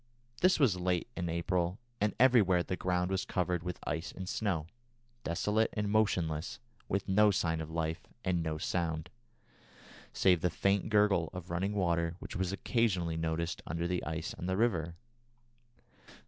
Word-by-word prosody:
This 185 -2 +5
was 120 -11 +4
late 90 -1 0
in 85 -2 -2
April, 85 +2 0 0.2
and 105 0 +1
everywhere 105 -9 +5
the 95 - -3
ground 90 0 0
was 95 0 0
covered 90 -2 -1
with 90 +1 -4
ice 80 +2 -3
and 95 0 -7
snow, 95 -7 -1 0.6
desolate 105 +6 +1
and 105 -2 -1
motionless, 85 -7 +1 0.3
with 100 +1 -1
no 105 +2 +5
sign 80 -5 0
of 80 - -6
life, 80 0 -2 0.2
and 90 -2 +1
no 80 -1 -2
sound, 80 0 -2 1.0
save 90 -4 +3
the 90 - +2
faint 100 +4 +1
gurgle 105 -6 +3
of 90 -1 -7
running 95 +4 -1
water 85 -3 +1
which - - -8
was 95 0 -1
occasionally 95 -5 0
noticed 80 +1 -2
under 85 +1 -2
the 90 0 -1
ice 80 +1 -3
on 90 - -4
the 95 0 0
river. 85 -8 +1
90 Hz, 160 wpm, -32 LUFS, 85-100 Hz, 1.0 s, This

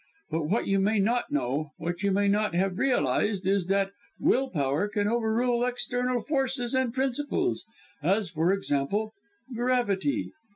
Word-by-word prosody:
But 160 -1 -1
what 210 +8 +1
you 195 0 +2
may 210 +3 +2
not 230 +5 +1
know 145 +2 -1
what 175 +2 -4
you 200 - +2
may 200 +1 +2
not 205 -3 +1
have 185 0 0
realized, 210 -6 +1
is 190 -2 +1
that 195 0 +1 0.3
will 265 +1 +2
power 145 - 0
can 205 -1 -1
over 225 0 +1
rule 240 +1 +1
external 245 0 0
forces 265 -2 -1
and 260 -2 +1
principles 275 +8 -1 0.4
as 195 +6 +2
for 165 +2 +1
example 195 +4 -1 0.4
gravity. 245 0 0
210 Hz, 155 wpm, -27 LUFS, 190-245 Hz, 0.4 s, you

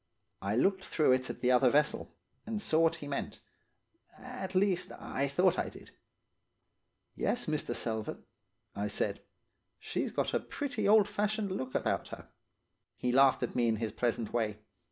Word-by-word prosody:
"I 100 +2 -1
looked 190 - +2
through 155 -7 +2
it 130 0 +2
at - - -6
the 125 - +3
other 125 0 +5
vessel, 150 +3 +1 0.4
and 220 -1 -2
saw 160 -6 +1
what 165 0 +4
he 145 - -8
meant; 140 - -4 0.8
at 250 -7 -7
least, 185 -2 +2
I 140 +1 -2
thought 180 +6 +2
I - - -1
did. - - -14 1.2
"'Yes, 245 - 0
Mr. 155 -1 -2
Selvern,' 110 -2 -4 0.5
I 100 +1 -1
said. 105 - -2 0.6
'She's - - -3
got - - -1
a - - +3
pretty 260 -8 -3
old 210 -1 +6
fashioned 210 0 -1
look 130 -8 -4
about - - 0
her.' - - -10 0.7
"He 125 - -1
laughed 135 +1 +5
at - - -2
me 120 -1 +2
in 115 - +2
his 110 0 -3
pleasant 115 0 -1
way. 110 -3 0
145 Hz, 165 wpm, -32 LUFS, 120-200 Hz, 1.2 s, old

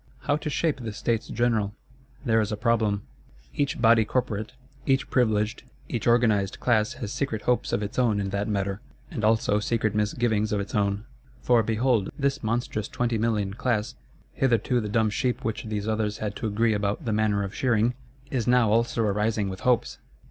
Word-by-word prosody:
How 145 - +1
to 150 - -4
shape 150 -1 0
the 110 -3 -5
States 115 +1 -1
General? 110 -4 0 0.5
There 115 -2 +3
is 110 +1 -2
a 105 - -2
problem. 110 -3 +1 0.5
Each 140 -1 -1
Body 115 -1 +5
corporate, 110 -1 -2 0.3
each 135 -1 +1
privileged, 110 -2 +1 0.3
each 120 -3 -2
organised 110 -5 +3
Class 115 0 +2
has 120 -4 -6
secret 110 -7 -2
hopes 125 -1 +1
of 105 - 0
its 105 +4 -3
own 115 -5 +2
in 100 -1 -2
that 100 +1 -1
matter; 100 -1 -2 0.3
and 110 - -4
also 110 -1 +3
secret 110 0 0
misgivings 105 0 0
of 105 - +1
its 100 - -5
own,—for, 105 +3 0
behold, 115 -1 +1
this 140 0 0
monstrous 110 -2 -2
twenty 120 -2 -1
million 105 -3 0
Class, 115 -2 -1 0.4
hitherto 125 -1 +2
the 105 - -4
dumb 110 0 +2
sheep 125 +2 -1
which 110 0 -2
these 105 -1 -3
others 110 -1 -1
had 105 -1 -4
to 115 - -3
agree 110 +2 +2
about 105 +6 -1
the 110 - 0
manner 105 -1 +1
of 100 0 -5
shearing, 120 -1 +2 0.4
is 125 -4 -1
now 120 -3 +4
also 115 +1 +2
arising 105 0 0
with 95 0 -6
hopes! 125 -2 +1
110 Hz, 180 wpm, -26 LUFS, 105-120 Hz, 0.5 s, Body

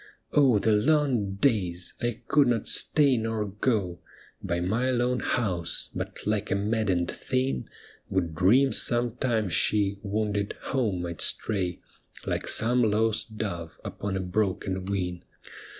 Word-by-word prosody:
Oh, 135 -6 +5
the 110 +2 +1
long 120 -4 +2
days! 95 -7 0
— - - -24
I 120 -2 -2
could 145 -3 +4
not 115 -3 0
stay 140 -4 +4
nor 110 -1 -2
go 100 -3 -1 0.4
By 85 - -2
my 110 +9 0
lone 125 0 +1
house, 90 -8 -2
but - - -6
like 105 0 -1
a - - +1
maddened 100 -4 0
thing 65 0 -2 0.4
Would 90 -4 -1
dream 115 - +4
some 120 -1 +3
time 115 -5 0
she, 100 +2 +1
wounded, 105 0 -2
home 110 -10 -1
might 85 -2 -5
stray 95 -5 0 0.4
Like - - -2
some 120 +3 +3
lost 110 0 0
dove 85 -7 -5
upon 100 -1 -4
a - - -2
broken 95 0 -2
wing. 90 -3 -3
105 Hz, 140 wpm, -27 LUFS, 95-120 Hz, 0.4 s, Oh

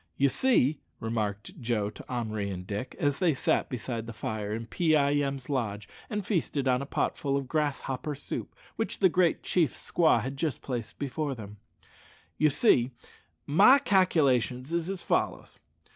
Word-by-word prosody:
"Ye 140 0 +4
see," 155 - +2 0.2
remarked 110 - -3
Joe 110 -3 -1
to - - -11
Henri 110 -4 -2
and 90 -2 -5
Dick, 105 +6 -5
as 145 -1 0
they 175 -6 +3
sat - - +1
beside 115 -2 -4
the 115 - -6
fire 110 -2 -4
in 115 +2 -3
Pee 160 +6 +2
eye 140 -1 +3
em's 140 -2 -1
lodge, 110 -7 -2 0.2
and 210 -2 -3
feasted 155 -8 -1
on 125 0 +2
a 140 - -5
potful 140 -1 -1
of 135 -2 -4
grasshopper 145 -1 -2
soup, 145 - -6 0.2
which 225 - -2
the 190 - +5
great 175 -1 +2
chief's 165 -7 0
squaw 160 -8 +4
had 130 +5 -4
just 150 0 -2
placed 120 -4 -5
before 140 0 -2
them 105 -2 -9 0.8
"ye 155 - +5
see, 130 - +3 0.6
my 200 - +7
calc'lations 150 - +2
is 170 +1 -1
as 195 -2 -3
follows. - - -1
135 Hz, 165 wpm, -28 LUFS, 115-160 Hz, 0.8 s, my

